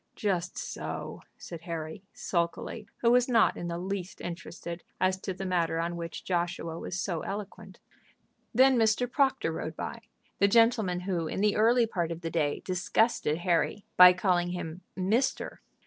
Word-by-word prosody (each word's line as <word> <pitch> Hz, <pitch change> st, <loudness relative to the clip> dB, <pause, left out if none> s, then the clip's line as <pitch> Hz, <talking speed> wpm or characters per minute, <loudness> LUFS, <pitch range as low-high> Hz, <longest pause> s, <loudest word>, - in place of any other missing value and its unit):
"Just 180 Hz, -4 st, -1 dB
so," -, -, -5 dB, 0.2 s
said 170 Hz, -2 st, -9 dB
Harry, 165 Hz, +1 st, -6 dB
sulkily, 175 Hz, +5 st, -2 dB, 0.2 s
who 235 Hz, -, +5 dB
was 250 Hz, +1 st, +4 dB
not 230 Hz, -3 st, +4 dB
in 175 Hz, -, -5 dB
the 170 Hz, 0 st, -3 dB
least 185 Hz, 0 st, -4 dB
interested 170 Hz, 0 st, -6 dB, 0.2 s
as 185 Hz, 0 st, +2 dB
to -, -, -3 dB
the 190 Hz, +1 st, -5 dB
matter 170 Hz, -3 st, 0 dB
on 170 Hz, +1 st, -2 dB
which 170 Hz, -1 st, -6 dB
Joshua 175 Hz, -2 st, -2 dB
was 190 Hz, -, -4 dB
so 180 Hz, -4 st, -2 dB
eloquent. 205 Hz, +1 st, -7 dB, 0.7 s
Then 260 Hz, +2 st, +5 dB
Mr. 225 Hz, +2 st, +3 dB
Proctor 265 Hz, -, +1 dB
rode 160 Hz, 0 st, -5 dB
by, 230 Hz, -, -5 dB, 0.4 s
the 200 Hz, -, +5 dB
gentleman 220 Hz, -5 st, +3 dB
who 180 Hz, -3 st, -2 dB
in 190 Hz, -, -3 dB
the 210 Hz, -1 st, +3 dB
early 235 Hz, +2 st, +4 dB
part 175 Hz, -7 st, -2 dB
of 165 Hz, 0 st, -5 dB
the 165 Hz, -1 st, -4 dB
day 150 Hz, -3 st, 0 dB
disgusted 185 Hz, -2 st, +1 dB
Harry 175 Hz, +3 st, +1 dB
by 180 Hz, 0 st, +10 dB
calling 175 Hz, -1 st, +1 dB
him 175 Hz, -1 st, -5 dB
"mister." 215 Hz, +8 st, 0 dB
180 Hz, 165 wpm, -29 LUFS, 170-215 Hz, 0.7 s, by